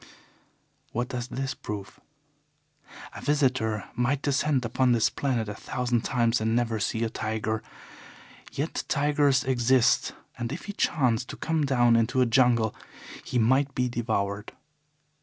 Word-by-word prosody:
What 120 +1 -2
does 125 -1 -4
this 135 +1 -3
prove? 100 -2 -7 1.1
A - - -8
visitor 130 -8 +1
might 130 +3 0
descend 140 -2 +1
upon 125 +2 +2
this 115 -2 +2
planet 125 -6 -1
a 105 - -4
thousand 120 +2 -2
times 120 -1 +1
and 110 +1 +1
never 115 -2 0
see 110 +3 -1
a 115 - 0
tiger. 110 0 -2 0.9
Yet 145 +4 -3
tigers 145 -1 +2
exist, 130 -1 +2 0.3
and 120 0 -3
if 150 - -6
he 205 - -5
chanced 125 - +1
to - - -7
come 160 -3 0
down 120 -3 +4
into 115 +3 +2
a 125 - +5
jungle 115 -2 +3 0.5
he - - -2
might 130 +4 +2
be 125 0 +1
devoured. 110 -3 -2
120 Hz, 140 wpm, -27 LUFS, 115-135 Hz, 1.1 s, a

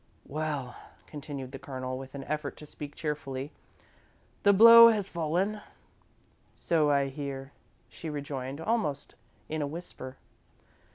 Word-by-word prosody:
"Well," 145 -4 -3 0.3
continued 140 -3 -7
the 135 - -8
Colonel, 130 -1 -5
with 135 +1 -8
an 140 - -6
effort 150 0 -4
to 150 - -11
speak 145 0 -9
cheerfully, 145 -2 -4 0.9
"the 200 - +6
blow 230 +3 +10
has 210 -4 0
fallen." 180 +6 -1 0.9
"So 155 -3 +1
I 140 -1 +2
hear," 135 -1 -6 0.4
she 165 - -8
rejoined, 140 -2 -5
almost 165 -7 -1 0.3
in 155 0 -3
a 145 - -1
whisper. 140 -4 -8
145 Hz, 125 wpm, -29 LUFS, 135-165 Hz, 0.9 s, blow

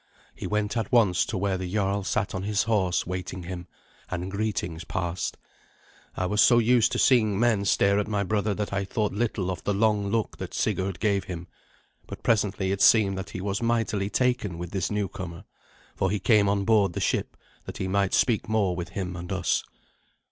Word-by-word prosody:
He - - -6
went 105 +1 -1
at 110 -3 -2
once 100 -8 +3
to 110 - -3
where 95 0 0
the 90 -1 -4
jarl 100 -1 0
sat 100 +2 -1
on 95 - -3
his 105 +1 0
horse 100 -5 +1
waiting 90 0 -5
him, 90 0 -7 0.4
and 90 +1 -4
greetings 100 -5 -2
passed. 85 -1 -3 0.8
I 90 - 0
was 105 +3 +2
so 120 - +6
used 120 0 +4
to - - 0
seeing 110 -6 +3
men 110 -4 +2
stare 100 +1 +3
at 105 - -1
my 105 -2 0
brother 105 +1 0
that 105 0 -3
I 100 0 0
thought 105 +1 -1
little 105 -3 -1
of 90 - -6
the 100 - 0
long 105 -1 +2
look 110 +2 -1
that - - -6
Sigurd 95 -1 -1
gave 100 -3 +1
him; 85 -1 -6 0.6
but - - -9
presently 105 -3 +1
it 100 - -2
seemed 100 -4 +5
that 95 - -6
he 90 - -6
was 100 +3 -2
mightily 115 -4 0
taken 125 -8 0
with 85 0 -6
this 95 -3 -1
newcomer, 95 -4 -4 0.5
for 95 - 0
he 105 - 0
came 105 0 +4
on 100 -1 0
board 105 -4 +3
the - - -3
ship, - - -1 0.3
that - - -7
he 95 - -2
might 100 0 +1
speak 115 -3 +1
more 100 -5 +1
with 85 -1 -5
him 90 -2 -4
and 90 +1 -7
us. 95 -1 0
100 Hz, 200 wpm, -26 LUFS, 95-105 Hz, 0.8 s, so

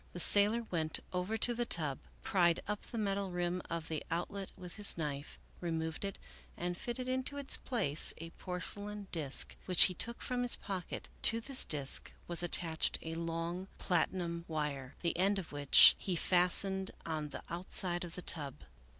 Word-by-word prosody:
The 175 - -6
sailor 210 +6 +5
went 160 -3 0
over 180 +5 -2
to 240 +2 +1
the 240 +1 -1
tub, 150 -5 -1 0.2
pried 175 -3 +2
up 210 0 -3
the 235 - -7
metal 200 -2 -1
rim 175 0 -2
of 165 -1 -4
the 160 -2 -4
outlet 185 +4 -4
with 180 -1 -10
his 205 -4 +3
knife, 145 -2 -5 0.2
removed 160 -1 -3
it, 195 -1 -4 0.4
and 175 0 -3
fitted 245 +6 -5
into 260 +2 -2
its 280 -1 +3
place 185 - +3
a 165 +1 -9
porcelain 200 +3 -2
disk 150 -5 0
which 180 -2 +8
he 185 - +6
took 235 +6 -2
from 250 -1 -2
his 245 -1 +5
pocket; 190 -4 -6
to 225 - +6
this 265 +3 0
disk 140 -3 -1
was 175 -1 +4
attached 165 -2 +1
a 160 - -5
long 170 +2 -4
platinum 170 -1 -1
wire, 145 -4 -4
the 170 - -1
end 200 +2 +2
of 185 -4 -6
which 145 -1 +8
he 185 - -2
fastened 190 +2 +1 0.2
on 155 -2 -4
the 145 - -8
outside 175 0 -2
of 175 -1 -8
the 180 - -7
tub. 145 -5 -2
175 Hz, 175 wpm, -33 LUFS, 165-200 Hz, 0.4 s, which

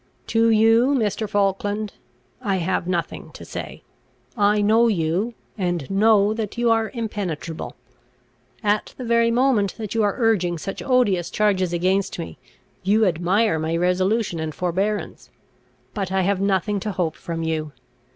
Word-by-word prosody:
"To 230 0 +2
you, 225 +5 +4
Mr. 215 -3 -1
Falkland, 205 +1 0 0.5
I 200 -5 0
have 180 -1 -1
nothing 175 -3 -3
to - - -10
say: - - -7 0.5
I 210 -1 +3
know 220 +3 +4
you, 190 +4 0 0.2
and 175 -6 -1
know 210 +1 +4
that 220 -1 -4
you 240 -1 +2
are 225 -1 +2
impenetrable. 195 -8 -4 0.9
At 210 0 0
the 255 - -6
very 235 0 +3
moment 235 -5 +2
that 215 -3 -5
you 225 - +1
are 205 -2 +1
urging 200 -8 +1
such 195 +5 -6
odious 220 -10 +2
charges 190 -4 +1
against 185 +3 0
me, 170 - -7 0.4
you 210 +3 +3
admire 180 +2 +1
my 160 +1 -1
resolution 185 +2 +1
and 160 -1 -4
forbearance. 195 +4 -2 0.6
But 195 -3 -3
I 190 0 +2
have 195 +1 0
nothing 200 +1 +1
to 210 +1 -4
hope 170 -4 -1
from 165 -1 -5
you. 155 -2 -2
200 Hz, 150 wpm, -22 LUFS, 180-220 Hz, 0.9 s, you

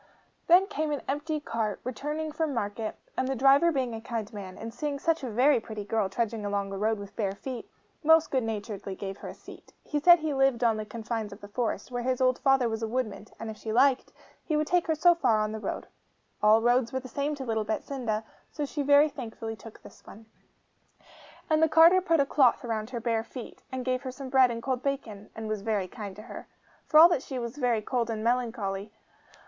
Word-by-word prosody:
Then 360 +3 +7
came 310 -5 -2
an 290 - -3
empty 300 +2 -2
cart, 225 -6 -3
returning 300 +5 -4
from 305 -2 -2
market; 215 0 -3 0.2
and 255 - 0
the 270 - -1
driver 275 +6 +5
being 260 -5 -1
a 225 - -6
kind 225 -2 -5
man, 190 -3 -8
and 225 0 -7
seeing 290 +2 -3
such 325 +1 0
a 255 - -3
very 250 +5 +4
pretty 215 -2 -7
girl 210 -2 0
trudging 225 +1 -2
along 200 -1 -2
the 195 - -5
road 220 +1 +1
with 200 -1 -10
bare 200 -4 -1
feet, 250 +3 -7 0.3
most 320 +1 +5
good 260 - +2
naturedly 210 -3 -4
gave 195 0 -6
her - - -9
a - - -8
seat. - - -14
He 295 - -2
said 345 +4 +8
he 310 -2 -2
lived 270 -3 +2
on 225 -2 +3
the 215 0 -5
confines 225 -2 -4
of 200 - -10
the 205 - -10
forest, 225 +1 -3
where 245 -1 -2
his 255 +1 -1
old 255 -1 +2
father 270 -3 +3
was 225 0 -3
a 225 - -1
woodman, 220 -3 -3
and, 225 -1 -5
if 215 - -11
she 220 - -5
liked, 260 +3 +3 0.3
he 310 - 0
would 305 - +1
take 355 +2 +1
her 320 - +2
so 345 +3 +5
far 255 -10 +2
on 215 0 -1
her 220 - -4
road. - - -4 0.6
All 215 +1 +5
roads 240 0 +3
were 260 - -1
the 260 - -10
same 285 +4 -2
to 270 -2 -6
little 220 -2 0
Betsinda, 220 0 -3 0.3
so 295 - -3
she 290 +1 -4
very 285 +2 +6
thankfully 225 -5 -6
took 225 0 -13
this - - -15
one. 220 +2 -12 1.2
And 310 0 +2
the 320 - +4
carter 330 +4 +7
put 330 -3 +2
a 280 - +4
cloth 270 -3 +3
round 220 -2 -3
her 245 -2 -4
bare 230 -1 0
feet, 245 +1 -10
and 260 -1 -4
gave 255 0 0
her 265 - -5
some 260 +1 -8
bread 260 -1 +5
and 230 -1 -5
cold 260 -2 -1
bacon, 230 -8 -4
and 220 0 -5
was 215 -1 -2
very 205 -3 -1
kind 200 -1 -8
to 210 - -10
her. 240 - -9 0.4
For 305 - +6
all 335 +2 +10
that 320 -7 +1
she 265 - -6
was 235 +2 -5
very 240 -5 +1
cold 240 0 -1
and 220 -1 -3
melancholy. 225 -4 -1
240 Hz, 230 wpm, -28 LUFS, 220-280 Hz, 1.2 s, all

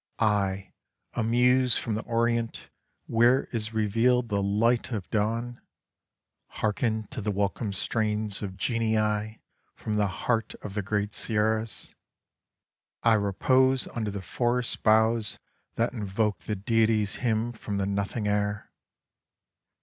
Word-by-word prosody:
I, 100 -3 0 0.4
a 120 - -1
muse 125 +2 +3
from 115 - -2
the 110 - -1
Orient, 115 0 -1 0.3
where 120 +3 +4
is 110 -1 -2
revealed 115 +3 +2
the 100 -2 0
light 115 +6 +1
of 105 -6 -3
dawn, 115 +3 -1 0.9
Harken 110 0 -1
to 130 - -5
the 105 - -2
welcome 100 +2 -1
strains 105 +1 -1
of 95 -3 -5
genii 110 -1 0 0.3
from 105 -1 -3
the 105 -1 +2
heart 110 +4 -1
of 100 - -6
the 105 - -1
great 105 +1 -2
Sierras 110 0 -1 0.6
— - - -61
I 115 - +5
repose 130 +6 +3
under 110 -3 -3
the 100 -1 -5
forest 120 +4 0
boughs 110 0 +3 0.4
that 115 +2 0
invoke 105 -1 -1
the 105 - -4
Deity's 110 0 +1
hymn 115 -1 0
from 105 -3 -5
the 100 - 0
Nothing 100 +2 -2
air. 105 0 -1
110 Hz, 130 wpm, -27 LUFS, 105-115 Hz, 0.9 s, I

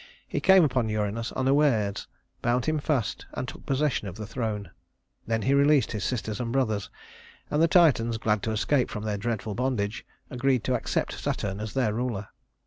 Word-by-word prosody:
He - - -2
came 190 -2 +6
upon 125 -6 +1
Uranus 110 +2 -2
unawares, 130 -7 +2 0.3
bound 120 0 +1
him 155 -1 +1
fast, 135 -7 -1
and 125 - -3
took - - -10
possession 135 -5 0
of 95 - -7
the 105 - -6
throne. 110 -3 -4 0.6
Then 115 -1 0
he 135 - +2
released 140 -3 +4
his 105 -3 -3
sisters 110 -3 -2
and 120 -2 -2
brothers, 110 -6 0 0.6
and 150 - +2
the 165 - +6
Titans, 135 -10 +4
glad 105 -1 +1
to 110 - -2
escape 125 +5 +1
from 105 - -5
their 105 -2 -2
dreadful 110 -1 -2
bondage, 115 -3 -1 0.3
agreed 130 -2 +1
to - - 0
accept - - -1
Saturn 100 0 -2
as 110 -1 -6
their 125 -6 +1
ruler. 115 -4 -3
115 Hz, 180 wpm, -27 LUFS, 105-135 Hz, 0.6 s, came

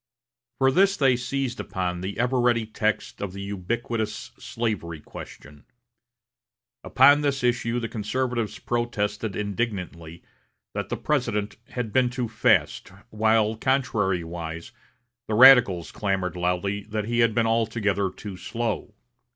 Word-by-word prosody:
For 135 0 +4
this 195 +6 +3
they 135 -3 +4
seized 125 0 -3
upon 90 -1 -3
the 95 +2 -5
ever 125 +2 +1
ready 120 -2 +2
text 110 0 -2
of 100 -2 -4
the 100 - -7
ubiquitous 105 +3 -3
slavery 105 -9 -3
question. 75 0 -12 1.2
Upon 145 +3 +5
this 140 -2 -1
issue 120 -1 +1
the 115 - -3
conservatives 120 +1 -2
protested 115 -3 -2
indignantly 95 -6 -4 0.5
that - - -4
the - - -2
President 115 -8 -1
had 120 -4 -4
been 130 -1 +3
too 125 -1 -3
fast, 110 - +1 0.2
while, 110 0 +2
contrarywise, 90 -9 -1 0.6
the 110 - -1
radicals 120 -9 +7
clamored 95 -3 -2
loudly 90 +3 -1
that 105 0 -3
he 120 +1 -1
had 115 -2 +3
been 115 - +3
altogether 110 -3 +1
too 100 0 -9
slow. 115 +1 -4
110 Hz, 125 wpm, -25 LUFS, 100-120 Hz, 1.2 s, radicals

